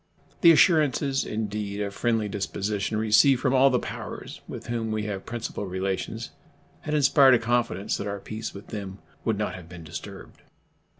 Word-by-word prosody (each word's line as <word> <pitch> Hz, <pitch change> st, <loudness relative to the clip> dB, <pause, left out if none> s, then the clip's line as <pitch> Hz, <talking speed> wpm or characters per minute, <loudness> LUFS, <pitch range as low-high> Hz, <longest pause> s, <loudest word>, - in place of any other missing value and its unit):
The 170 Hz, -, +9 dB
assurances, 150 Hz, -4 st, +3 dB
indeed, 105 Hz, -1 st, -3 dB
of 100 Hz, -1 st, -3 dB
friendly 115 Hz, -1 st, 0 dB
disposition 105 Hz, +1 st, -2 dB
received 110 Hz, +5 st, +5 dB
from 130 Hz, 0 st, +1 dB
all 135 Hz, +1 st, +6 dB
the 125 Hz, -, +2 dB
powers -, -, -7 dB
with -, -, -8 dB
whom 115 Hz, -2 st, -2 dB
we 110 Hz, -1 st, -1 dB
have 100 Hz, -2 st, -5 dB
principle 115 Hz, -3 st, -4 dB
relations 95 Hz, +1 st, -3 dB, 0.5 s
had 150 Hz, 0 st, -3 dB
inspired 135 Hz, -2 st, +6 dB
a -, -, +5 dB
confidence 115 Hz, -4 st, 0 dB
that 100 Hz, -, -4 dB
our 100 Hz, 0 st, -3 dB
peace 110 Hz, +2 st, -6 dB
with 100 Hz, -, -11 dB
them 100 Hz, -3 st, -6 dB, 0.3 s
would 110 Hz, -3 st, 0 dB
not 105 Hz, -, -2 dB
have 90 Hz, -2 st, -10 dB
been 85 Hz, -2 st, -10 dB
disturbed. 80 Hz, 0 st, -9 dB
110 Hz, 170 wpm, -26 LUFS, 100-125 Hz, 0.5 s, The